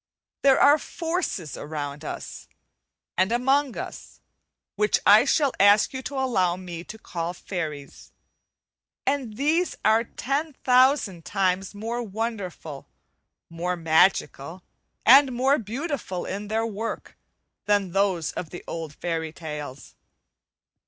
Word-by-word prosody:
There 275 -1 +5
are 290 +2 +6
forces 325 - -3
around 145 -1 -5
us, - - -7 0.7
and 190 +3 +3
among 265 +2 +2
us, - - -8 0.6
which 420 - +2
I - - +7
shall 285 -4 +2
ask 205 +4 +5
you 260 - -4
to 280 - -6
allow 190 -10 +1
me 175 -2 -7
to 220 - -9
call 175 -4 -5
fairies, 155 -7 -6 0.9
and 265 -6 -1
these 320 +6 +1
are 220 +1 +5
ten 285 +6 -3
thousand 250 - +3
times 195 +1 -1
more 230 +4 -3
wonderful, 200 -9 -5 0.6
more 175 +2 -3
magical, 165 0 +1 0.4
and 265 +2 +7
more 265 +4 +2
beautiful 235 - -4
in 205 +2 -5
their 220 +2 0
work, 225 +1 -5 0.5
than 205 -3 +2
those 190 -4 +1
of 170 - -6
the 175 - -9
old 160 -3 -6
fairy 165 -2 -3
tales. 150 -5 -8
205 Hz, 120 wpm, -25 LUFS, 170-260 Hz, 0.9 s, I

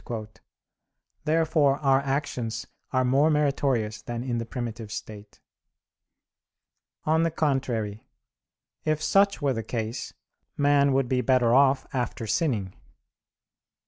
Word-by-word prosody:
Therefore 155 -3 +3
our 135 -2 +3
actions 135 -5 -2 0.3
are 130 -1 +2
more 135 +5 +4
meritorious 135 -8 0
than 120 +1 -5
in 120 -2 -2
the 115 - -5
primitive 115 -3 -5
state. 105 -1 -8 1.6
On 160 +1 +2
the 165 - +2
contrary, 125 -9 -1 0.8
if 155 -1 0
such 195 0 +2
were 140 -2 +2
the 115 - -3
case, 115 +1 -4 0.4
man 140 -1 +4
would 135 -1 +2
be 125 0 +1
better 125 -3 +3
off 135 +1 +4
after 120 -2 -2
sinning. 110 - 0
130 Hz, 110 wpm, -26 LUFS, 115-145 Hz, 1.6 s, more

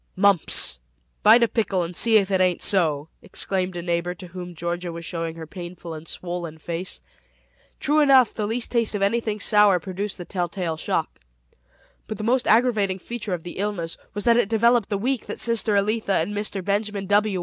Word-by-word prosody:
"Mumps. 190 - +2 0.4
Bite 235 - +7
a - - +4
pickle 195 -6 0
and 170 +1 -6
see 225 +3 +5
if 200 -1 +1
it 190 -1 +2
ain't 180 -1 +2
so!" 160 -6 +1
exclaimed 185 -2 -2
a 170 - -5
neighbor 175 +1 -1
to 180 -1 -11
whom 180 0 -8
Georgia 175 +1 -3
was 170 0 -7
showing 165 -1 -4
her 165 -1 -8
painful 175 0 -8
and 155 +1 -9
swollen 175 -3 -5
face. 170 +3 -5 0.8
True 300 +1 +2
enough, 270 -4 +5
the 210 -2 -2
least 230 +2 -1
taste 230 -3 +1
of 200 - -1
anything 215 0 0
sour 205 -3 +4
produced 195 +3 -5
the 175 - -7
tell 175 -2 -2
tale 170 -3 -3
shock. 160 - -2 0.9
But 215 - -5
the 215 - -5
most 245 +3 +1
aggravating 215 -5 +3
feature 210 -1 -4
of 165 - -10
the 175 - -8
illness 195 -5 -2 0.2
was 205 - -2
that 235 -1 +4
it 225 -4 +2
developed 230 -1 +3
the 205 - 0
week 250 +4 -2
that - - -6
sister 230 -2 +1
Elitha 210 0 +1
and 205 - -5
Mr. 205 -2 -3
Benjamin 205 0 -1
W. 205 -1 +2
195 Hz, 195 wpm, -23 LUFS, 175-215 Hz, 0.9 s, Bite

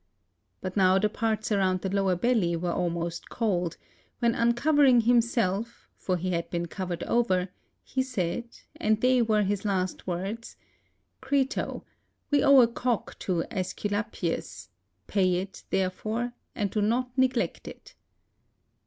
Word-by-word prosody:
But 185 -1 -5
now 190 -1 +5
the 210 +2 +2
parts 220 0 -1
around 190 -3 +2
the 190 - -2
lower 195 -2 +2
belly 185 -4 +1
were 175 +1 -2
almost 170 -1 -2
cold; 180 -7 -1 0.4
when 235 -1 +2
uncovering 245 +2 +4
himself, 235 -2 +1
for 185 -1 -1
he 185 +2 -2
had 170 -1 -2
been 170 -1 -2
covered 175 -1 -4
over, 190 -6 +1 0.3
he 265 - -1
said, 230 -4 -2 0.3
and 215 0 +1
they 255 +1 +4
were 215 -2 +2
his 200 0 -1
last 190 -3 -2
words, 195 +6 -4 0.3
" - - -46
Crito, 280 0 -1 0.5
we 285 -1 +4
owe 275 -2 +8
a 235 - +6
cock 240 -1 -2
to 175 -3 -1
.^sculapius; 185 - -3 0.4
pay 185 -3 +2
it, 190 +2 -5
therefore, 215 +6 -1 0.2
and 205 -3 -1
do 215 - 0
not 245 +4 0
neglect 260 -2 0
it." - - -11
205 Hz, 140 wpm, -27 LUFS, 185-235 Hz, 0.5 s, owe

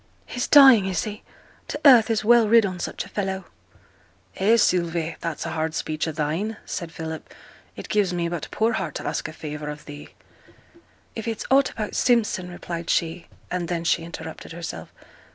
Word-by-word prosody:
'He's 245 - -3
dying, 265 -9 +8
is 185 -3 -1
he? 210 -1 -6 0.5
t' - - -4
earth 245 -6 +8
is 220 -1 0
well 235 -1 +6
rid 230 -1 +6
on 185 -2 -4
such - - -4
a - - -13
fellow!' 190 -2 -3 0.9
'Eh, 215 +5 +4
Sylvie, 170 -5 +1
that's 165 -1 -4
a 165 - -3
hard 160 0 -2
speech 155 +1 -2
o' - - -1
thine!' 160 +9 -2
said 170 -3 -5
Philip; 160 -1 -7 0.4
'it - - -8
gives 205 -3 +1
me 175 -1 -1
but 170 -3 -4
poor 225 +1 +1
heart 190 -9 -3
to - - -5
ask - - -2
a - - -7
favour 150 -1 -6
of 150 0 -8
thee!' 145 0 -10 1.1
'If 225 0 -5
it's 225 -2 -3
aught 275 0 +5
about 215 -2 -5
Simpson,' 220 -7 +1
replied 170 -1 -6
she, 165 0 0 0.2
and 180 -1 -2
then 170 0 -2
she 170 - +2
interrupted 165 -1 -8
herself. 170 0 -7
180 Hz, 185 wpm, -24 LUFS, 160-220 Hz, 1.1 s, dying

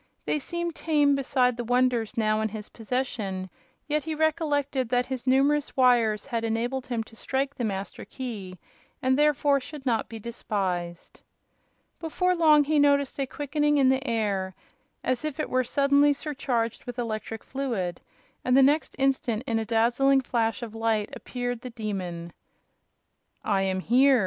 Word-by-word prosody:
They 300 - 0
seemed 345 +3 -3
tame 295 -3 +2
beside 255 -3 +1
the 240 - -2
wonders 245 -1 +1
now 215 -1 +2
in 220 - 0
his 210 0 -8
possession; 215 -6 -3 0.4
yet 300 0 0
he 315 0 -3
recollected 290 -5 0
that 250 0 +2
his 260 -1 -5
numerous 280 +3 +2
wires 240 -5 +3
had 235 -4 -2
enabled 240 +4 -2
him 235 -3 -2
to 225 - -18
strike 270 +4 -2
the 245 - -5
Master 195 -3 -4
Key, 210 -8 -7 0.4
and 260 -2 +2
therefore 290 -1 +3
should 285 +1 -10
not 230 -4 0
be 225 - -7
despised. 190 -6 -4 0.8
Before 360 +3 0
long 310 -3 +6
he 300 +1 +2
noticed 280 -1 +3
a 270 - 0
quickening 295 +2 0
in 270 -2 +5
the 265 0 +2
air, 200 -5 -1 0.5
as 255 +1 -1
if 305 -1 -4
it - - -2
were 255 0 +2
suddenly 280 +3 +3
surcharged 260 -6 -2
with 245 -1 -7
electric 225 -2 -4
fluid, 235 -10 -3 0.4
and 255 +1 +3
the 270 - +7
next 295 +4 +2
instant, 260 -4 0
in 230 -4 0
a 220 - -2
dazzling 240 +5 +3
flash 230 -2 -1
of 225 -2 -7
light, 225 -2 0
appeared 245 -2 -4
the 250 - -6
Demon. 185 -7 -5 1.1
"I 200 -2 +2
am 190 -1 0
here!" 260 +5 +5
250 Hz, 160 wpm, -26 LUFS, 225-280 Hz, 1.1 s, the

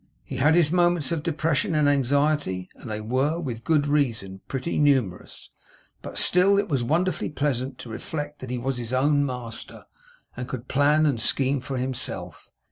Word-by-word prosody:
He 130 - -6
had 150 +5 +4
his 165 -3 +4
moments 175 -4 +2
of 165 -3 0
depression 160 -1 0
and 150 -1 +3
anxiety, 140 -8 +1
and 120 - -10
they 105 0 -3
were, 130 +9 0
with 120 -8 -5
good 150 0 +2
reason, 115 -10 0
pretty 135 +5 -2
numerous; 130 -11 0 0.5
but - - -8
still, 190 +3 +4
it 200 - +1
was 135 -6 0
wonderfully 165 +7 0
pleasant 135 -3 -2
to 120 - -9
reflect 145 +6 -5
that 130 - -7
he 125 - -2
was 130 +2 -2
his 120 +1 -5
own 145 +2 +3
master, 125 -4 -5 0.5
and 125 - -5
could 125 -1 -6
plan 145 +3 +3
and 135 -7 +1
scheme 135 +3 +1
for 130 +1 -4
himself. 130 0 -5
140 Hz, 175 wpm, -25 LUFS, 125-150 Hz, 0.5 s, had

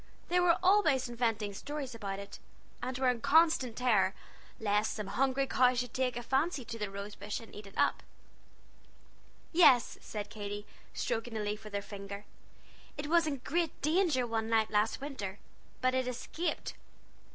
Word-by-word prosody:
They 360 +1 +3
were 355 -1 +4
always 340 -10 +4
inventing 225 -4 -1
stories 285 +3 -5
about 200 -4 -4
it, 200 0 -9 0.4
and 250 +1 -3
were 260 -1 +3
in 245 -2 -1
constant 315 -6 +4
terror 215 -6 +3 0.4
lest 210 0 +1
some 210 - -4
hungry 265 +6 +1
cow 255 -1 +4
should 245 0 -2
take 255 -2 0
a 240 - -4
fancy 270 +2 0
to 230 0 -6
the 210 -2 -2
rose 200 +1 -6
bush 205 +1 -4
and 230 - -13
eat 210 -1 -9
it 195 - -14
up. - - +2 1.5
"Yes," 285 -8 +5
said 210 -1 -6
Katy, 205 -1 -5 0.3
stroking 225 0 -2
a - - -1
leaf 210 +1 -3
with 210 -1 -7
her 200 - -1
finger, 200 0 -8 0.7
"it 290 - -3
was 335 +1 +3
in 280 -4 -2
great 335 0 0
danger 310 -5 +3
one 225 -1 -2
night 220 -1 +2
last 210 +3 +1
winter, 210 -9 -5 0.4
but 255 0 +3
it 260 -1 +1
escaped." 250 +7 -3
240 Hz, 170 wpm, -32 LUFS, 210-275 Hz, 1.5 s, Yes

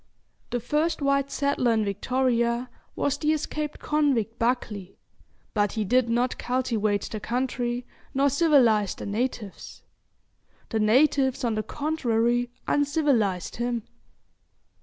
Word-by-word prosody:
The 245 - -1
first 300 +8 0
white 275 0 +2
settler 280 -5 +1
in 220 -1 +1
Victoria 235 +3 0 0.2
was 285 - 0
the 305 0 +2
escaped 300 0 -3
convict 265 -7 0
Buckley; 225 -5 -2 0.6
but 205 -2 +1
he 220 - -1
did 250 +3 +2
not 240 +2 0
cultivate 230 -5 0
the 215 - -5
country, 245 +1 -2 0.3
nor 275 +1 +2
civilise 255 - +4
the - - -7
natives. 215 -1 -4 0.9
The 220 - -1
natives, 265 +4 +3
on 235 -2 +1
the 215 - 0
contrary, 245 -4 0 0.2
uncivilised 280 - +1
him. 240 -1 -1
245 Hz, 115 wpm, -26 LUFS, 225-275 Hz, 0.9 s, civilise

